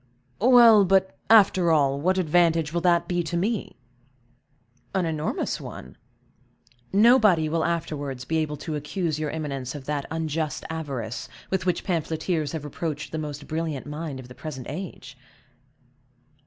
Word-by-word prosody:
"Well, 235 -3 +7
but, 190 0 +2
after 195 -5 +6
all, 140 -3 +2
what 185 +4 +2
advantage 165 -2 +2
will 170 - 0
that 175 -1 +3
be 175 -1 0
to 170 +1 -3
me?" 205 - -2 1.2
"An 185 -2 +1
enormous 155 -1 -2
one. 65 - -9 1.0
Nobody 210 -6 +5
will 160 +1 0
afterwards 145 -6 -3
be 160 +4 -1
able 150 -1 -2
to 155 - -3
accuse 155 +1 -2
your 155 -1 -2
eminence 140 -4 -4
of 140 -2 -8
that 145 -1 -3
unjust 160 -1 -3
avarice 135 -8 -5 0.2
with 190 -1 -1
which 180 - 0
pamphleteers 160 -2 -1
have 155 -3 -4
reproached 150 0 -4
the 160 - -3
most 145 -2 -6
brilliant 155 -3 -3
mind 150 -2 -5
of 125 - -10
the 125 - -11
present 130 -3 -7
age." 150 -5 -7
160 Hz, 145 wpm, -25 LUFS, 145-175 Hz, 1.2 s, Well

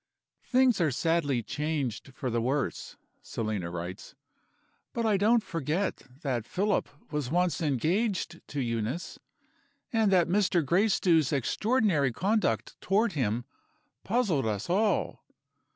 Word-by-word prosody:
"Things 250 -6 +3
are 160 - +3
sadly 145 -3 +1
changed 145 -4 -3
for 130 - -3
the 115 0 0
worse" 130 +2 -2 0.2
(Selina 105 -6 -3
writes); 85 +2 -7 0.8
"but 230 - -1
I 215 -2 +3
don't 215 +3 +3
forget 165 +3 -2 0.2
that 125 -6 -1
Philip 200 -2 0 0.2
was 150 -4 -1
once 175 +1 +1
engaged 170 - 0
to 145 - -4
Euneece, 115 +6 -3 0.7
and 220 -3 +3
that 180 -3 +4
Mr. 180 -3 +2
Gracedieu's 175 -3 +3
extraordinary 170 - +1
conduct 210 - 0
toward 210 +2 +2
him 120 -4 -1 0.6
puzzled 195 - +1
us 105 - -2
all. 210 +3 +1
165 Hz, 120 wpm, -29 LUFS, 130-200 Hz, 0.8 s, that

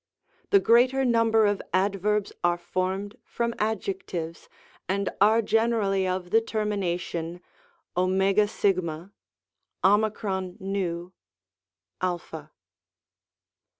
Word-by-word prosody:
The 400 - +6
greater 255 0 +4
number 230 -2 +3
of 205 -1 +1
Adverbs 200 +2 0
are 175 0 +3
formed 185 +4 -3
from 235 0 -2
Adjectives, 190 -6 -3 0.4
and 200 +1 0
are 220 +3 +5
generally 215 -4 +1
of 185 -1 -3
the 225 - +5
termination 180 -6 -2 0.6
cjg^ 190 -2 +1 2.9
ov, 180 -3 -3
a. 155 -1 -8
195 Hz, 80 wpm, -26 LUFS, 180-220 Hz, 2.9 s, The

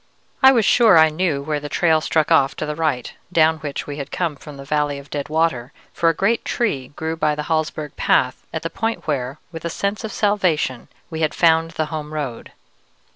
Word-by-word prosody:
I 265 -1 +9
was 230 -5 +3
sure 225 -6 +6
I 160 0 +7
knew 155 -3 -1
where 150 0 -2
the 145 0 -7
trail 160 0 +2
struck 155 0 0
off 140 -4 +4
to - - -3
the 150 - -3
right, 150 -6 -1 0.2
down 160 -2 +3
which 145 -2 -5
we 145 0 -6
had 140 -1 -5
come 170 -5 -1
from 145 +1 -11
the 140 - -9
valley 145 0 0
of 140 0 -12
dead 145 -1 -4
water, 155 -6 0 0.2
for 165 - +2
a - - +2
great 225 +7 +1
tree 140 - -1
grew 160 +1 -3
by 155 -2 +1
the 150 - -4
Hallsberg 155 -1 -2
path - - +1
at - - -4
the - - -3
point 225 0 -3
where, 135 -3 -2
with 165 -1 -8
a 170 - -2
sense 200 +6 -2
of 220 - -4
salvation, 180 - 0 0.2
we 160 0 -4
had 155 - 0
found 165 -1 +3
the 155 - +1
home 155 0 -5
road. 135 -6 -5
155 Hz, 220 wpm, -21 LUFS, 145-165 Hz, 0.2 s, I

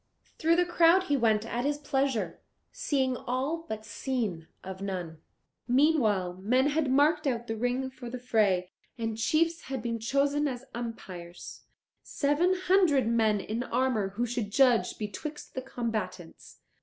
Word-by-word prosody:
Through 330 +1 +4
the 355 +1 +3
crowd 345 +1 +5
he 290 -6 +1
went 220 -4 +2
at 240 +1 -2
his 290 +1 0
pleasure, 270 -4 -1 0.3
seeing 265 -3 0
all 275 +8 -3
but 220 0 -5
seen 210 -9 -3 0.2
of 190 0 -7
none. 180 -5 -4 0.5
Meanwhile 240 - +2
men 255 +7 +3
had 295 -1 0
marked 295 +3 +3
out 240 -3 -1
the 225 - -3
ring 245 +3 -1
for 250 -2 -9
the 255 - -5
fray, 210 -7 +1 0.3
and 225 -1 -2
chiefs 325 +8 +1
had 265 -4 -4
been 230 -1 -2
chosen 280 +5 +1
as 260 -1 -5
umpires, 185 -7 -8 0.4
seven 315 +6 +1
hundred 360 - +4
men 220 -3 +2
in 220 +4 -3
armour 250 -6 0
who 240 +3 0
should 235 -3 -3
judge 250 0 +3
betwixt 295 +8 -6
the 260 - -3
combatants. 215 -9 -5
245 Hz, 150 wpm, -29 LUFS, 220-285 Hz, 0.5 s, crowd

